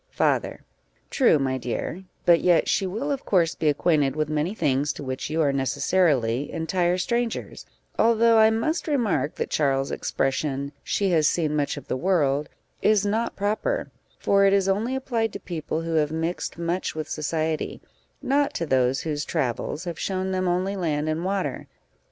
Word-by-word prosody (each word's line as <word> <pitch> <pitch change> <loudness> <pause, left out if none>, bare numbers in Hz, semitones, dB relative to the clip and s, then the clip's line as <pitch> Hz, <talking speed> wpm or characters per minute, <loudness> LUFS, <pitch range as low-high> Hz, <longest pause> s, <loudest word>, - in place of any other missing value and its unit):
Father. - - 0 0.5
True, 250 - +4
my 130 -2 -1
dear; 140 +9 -4 0.2
but 170 -1 +5
yet 175 -2 +3
she 195 - +1
will, 230 +10 -3
of 275 - -2
course, 170 -4 +2
be 155 - 0
acquainted 145 -2 +2
with 155 0 -1
many 155 +6 -1
things 145 -5 +1
to - - -8
which 130 +1 -4
you 160 +1 +1
are 140 -2 +2
necessarily 135 -2 +1
entire 175 +2 0
strangers, 235 +4 -2 0.3
although 230 0 +5
I 220 0 +7
must 230 +12 -1
remark 215 - 0
that - - -3
Charles's 135 -2 +1
expression, 140 +1 -1
"she 195 -2 0
has 155 -3 +4
seen 155 -3 0
much 145 0 -1
of 145 - -9
the - - -1
world," 150 -3 +1 0.3
is 210 -1 +3
not 220 +3 -1
proper; 215 - -1 0.3
for 200 0 +3
it 195 0 +5
is 195 -1 +3
only 215 +7 0
applied 235 -4 -1
to - - -5
people 160 -2 -4
who 165 0 -3
have 150 -2 +2
mixed 165 +2 -3
much 170 +1 -2
with 155 -1 -4
society 155 +1 -2 0.4
not 280 +1 +1
to 170 - -1
those 130 -2 +2
whose 150 -2 -2
travels 130 +6 -2
have 175 -2 -5
shown 190 0 -2
them 185 0 0
only 185 +3 0
land 155 -5 -1
and 155 +2 -2
water. 185 -8 -2
165 Hz, 175 wpm, -25 LUFS, 145-200 Hz, 0.5 s, I